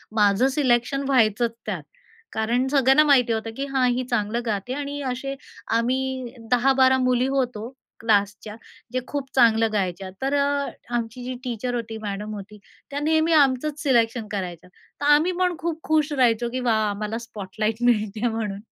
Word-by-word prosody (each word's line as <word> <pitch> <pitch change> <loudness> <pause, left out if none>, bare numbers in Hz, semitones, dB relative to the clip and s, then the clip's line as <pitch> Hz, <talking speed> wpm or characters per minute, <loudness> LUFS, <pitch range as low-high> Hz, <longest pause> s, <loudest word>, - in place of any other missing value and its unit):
माझं 205 +3 +4
सिलेक्शन 270 -1 +1
व्हायचंच 235 -3 +3
त्यात. - - -4 0.5
कारण 235 +4 0
सगळ्यांना 270 +1 +5
माहिती 255 -6 +4
होतं, 225 0 -3
की 275 - -2
हां, 265 -2 +2
ही 250 +1 -1
चांगलं 230 0 0
गाते 215 +2 -2
आणि 285 +1 -4
असे 275 +2 -4 0.4
आम्ही 255 +1 -1 0.2
10-12 260 +1 +4
मुली 255 0 +2
होतो 250 -4 -1 0.3
क्लासच्या, 205 -1 0 0.4
जे 255 - +1
खूप 280 -2 -4
चांगलं 225 -3 +4
गायच्या. 190 -2 -2
तर 270 +1 0
अ, 280 0 +1 0.3
आमची 235 +1 -3
जी 255 +1 -4
टीचर 245 0 -3
होती, 225 -2 -4
मॅडम 210 0 -4
होती, 205 +1 -10 0.3
त्या 280 - -2
नेहमी 315 +2 +2
आमचंच 290 0 +2
सिलेक्शन 235 -4 +2
करायच्या, 180 -3 -5 0.3
तर - - -1
आम्ही 315 +5 +3
पण 360 -1 +2
खूप 330 -1 -3
खुश 310 -1 +1
राहायचो 240 -3 +2
की 255 - -2
वा - - +4 0.2
आम्हाला 210 +2 -3
स्पॉटलाइट 215 +1 -3
मिळते 220 -1 +1
म्हणून. 220 -3 -3
245 Hz, 155 wpm, -24 LUFS, 220-270 Hz, 0.5 s, सगळ्यांना